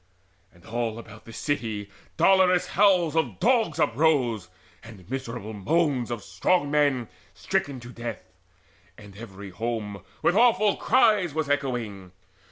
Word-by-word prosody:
And 85 Hz, 0 st, -22 dB
all 115 Hz, 0 st, -3 dB
about 110 Hz, -2 st, -12 dB
the 115 Hz, -, -11 dB
city 110 Hz, -5 st, -3 dB, 0.3 s
dolorous 185 Hz, -2 st, +4 dB
howls 180 Hz, -5 st, +3 dB
Of 160 Hz, -, -1 dB
dogs 225 Hz, -, +2 dB
uprose, 125 Hz, -, +1 dB, 0.3 s
and 105 Hz, -6 st, -13 dB
miserable 120 Hz, -4 st, -5 dB
moans 135 Hz, -, 0 dB
Of 120 Hz, -4 st, -4 dB
strong 175 Hz, -6 st, 0 dB
men 140 Hz, -5 st, +2 dB, 0.3 s
stricken 140 Hz, -3 st, -2 dB
to 120 Hz, -, -10 dB
death; 120 Hz, -2 st, -6 dB, 0.7 s
and 100 Hz, -2 st, -14 dB
every 100 Hz, -3 st, -10 dB
home 105 Hz, -1 st, -4 dB, 0.2 s
With -, -, +4 dB
awful 215 Hz, -3 st, +4 dB
cries 210 Hz, -, +3 dB
was 155 Hz, -3 st, -1 dB
echoing. 115 Hz, -10 st, -3 dB
125 Hz, 130 wpm, -26 LUFS, 110-160 Hz, 0.7 s, dolorous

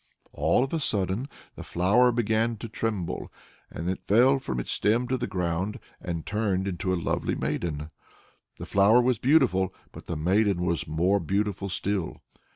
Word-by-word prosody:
All 125 Hz, -, +2 dB
of 135 Hz, -, -4 dB
a 165 Hz, -, +1 dB
sudden 105 Hz, 0 st, -1 dB, 0.3 s
the -, -, -8 dB
flower 105 Hz, +8 st, +3 dB
began 115 Hz, 0 st, 0 dB
to 115 Hz, -, -7 dB
tremble, 105 Hz, -5 st, -3 dB, 0.4 s
then 80 Hz, -, -6 dB
it 95 Hz, -, -2 dB
fell 125 Hz, +6 st, +5 dB
from 65 Hz, -, -4 dB
its -, -, -4 dB
stem 115 Hz, +4 st, +1 dB
to 130 Hz, -, +1 dB
the -, -, -2 dB
ground, 95 Hz, +3 st, -2 dB, 0.2 s
and 85 Hz, -3 st, -4 dB
turned 100 Hz, -3 st, -1 dB
into 95 Hz, 0 st, -2 dB
a 95 Hz, -, +1 dB
lovely -, -, -1 dB
maiden. 75 Hz, -2 st, -3 dB, 0.7 s
The -, -, -7 dB
flower 100 Hz, +5 st, +5 dB
was 125 Hz, -2 st, +2 dB
beautiful, 125 Hz, -, +3 dB, 0.2 s
but -, -, -12 dB
the 85 Hz, -, -3 dB
maiden 95 Hz, +3 st, +2 dB
was 85 Hz, -1 st, -1 dB
more 90 Hz, +6 st, +2 dB
beautiful 100 Hz, +2 st, -1 dB
still. 95 Hz, -1 st, -2 dB
100 Hz, 165 wpm, -27 LUFS, 90-115 Hz, 0.7 s, fell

